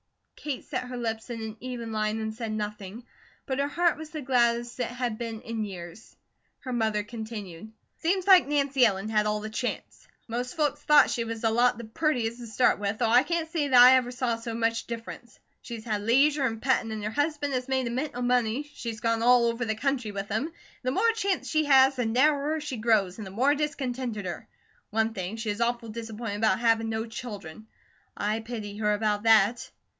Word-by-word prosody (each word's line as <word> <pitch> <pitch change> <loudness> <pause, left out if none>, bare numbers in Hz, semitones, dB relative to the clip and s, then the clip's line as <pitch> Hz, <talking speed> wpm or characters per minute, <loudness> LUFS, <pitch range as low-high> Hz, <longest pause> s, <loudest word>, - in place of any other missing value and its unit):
Kate 290 -4 -5
set - - -3
her 250 0 -6
lips 225 -1 -3
in 235 -1 -5
an 220 0 -6
even 240 -2 -6
line 215 0 -1
and 220 0 -3
said 225 -1 -5
nothing, 210 +1 -5 0.4
but 265 -1 -2
her 280 - +1
heart 340 +2 +2
was 315 -1 -8
the 310 -2 -6
gladdest 240 -1 +1
it 245 - 0
had 245 -3 -3
been 230 -2 -4
in 225 -1 -4
years. 185 0 -9 0.5
Her 255 -2 -5
mother 220 -3 0
continued: 215 -3 -8 0.3
"Seems 360 +3 0
like 375 -6 +7
Nancy 280 -2 +2
Ellen 200 -2 +2
had 210 -1 +2
all 210 0 -1
the 215 0 -6
chance. 245 +3 -5 0.2
Most 245 +2 -4
folks 295 -1 0
thought 295 -1 +5
she 235 - -1
was 230 0 -6
a 225 - +3
lot 240 0 +3
the 235 - -7
purtiest 235 -1 -1
to 240 - -8
start 225 +1 +2
with, 205 +1 -2
though 240 - +1
I 245 +2 +7
can't 325 +2 -2
say 315 -4 0
that 255 -3 +6
I 255 +1 +9
ever 250 -1 -1
saw 245 -1 -1
so 230 0 -5
much 230 0 0
difference. 235 0 -8 0.2
She's 230 -1 -8
had 215 -3 -1
leisure 275 +6 +3
an' 225 -3 -2
pettin', 250 -2 +1
and 215 -1 -5
her 215 - -2
husband 290 +1 -1
has 255 0 -2
made 260 -1 0
a 235 - -2
mint 265 +4 -3
o' 245 - -3
money; 245 +1 +1
she's 230 -5 -6
gone 230 -1 +1
all 245 0 +5
over 235 +1 0
the 220 -2 -1
country 250 -1 -1
with 200 0 -5
him, 220 +7 0
and 330 - -14 0.3
the 255 - -1
more 445 - +3
chance 400 -4 -1
she 310 -1 +1
has, 270 -1 +5
the 245 -2 0
narrower 290 +5 +2
she 295 -4 -5
grows, 215 -4 +1
and 210 - -6
the - - -9
more 260 +8 +3
discontenteder. 255 - -3 0.4
One 220 +1 0
thing, 190 0 -4
she 225 -1 -3
is 205 +3 -5
awful 235 -1 -1
disappointed 225 -1 -5
about 215 -3 +2
havin' 225 -1 +2
no 220 0 -2
children. 215 -5 -8 0.5
I 210 +2 0
pity 220 -3 -6
her 210 -1 +1
about 210 -1 0
that." 220 +1 +4
235 Hz, 215 wpm, -27 LUFS, 220-260 Hz, 0.5 s, I